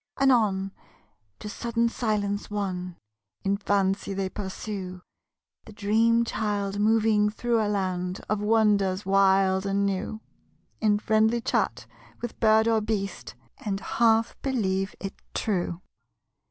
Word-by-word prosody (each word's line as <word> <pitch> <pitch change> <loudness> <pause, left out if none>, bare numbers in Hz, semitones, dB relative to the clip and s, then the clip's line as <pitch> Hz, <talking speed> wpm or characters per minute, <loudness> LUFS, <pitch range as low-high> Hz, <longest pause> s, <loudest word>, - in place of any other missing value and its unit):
Anon, 215 -8 +3 0.7
to - - -8
sudden 235 +2 -1
silence 210 -3 -1
won, 185 -4 -3 0.5
In 195 +1 +1
fancy 200 -1 0
they 195 -1 -1
pursue 190 -2 -6 0.6
The 215 - -12
dream 225 +3 +2
child 205 -3 -2
moving 215 -1 +3
through 230 +1 0
a 210 - 0
land 185 -2 -2
Of 215 -1 -1
wonders 210 -3 +2
wild 190 -1 +3
and 200 0 +1
new, 200 +2 -2 0.6
In 210 -2 +3
friendly 220 +2 +2
chat 235 - -1 0.3
with 240 - -6
bird 220 -1 +4
or 225 -1 +3
beast 200 - -3 0.2
And 195 -2 -3
half 225 +1 +2
believe 195 -7 -1
it 195 - -5 0.2
true. 175 -4 -1
205 Hz, 120 wpm, -26 LUFS, 195-220 Hz, 0.7 s, bird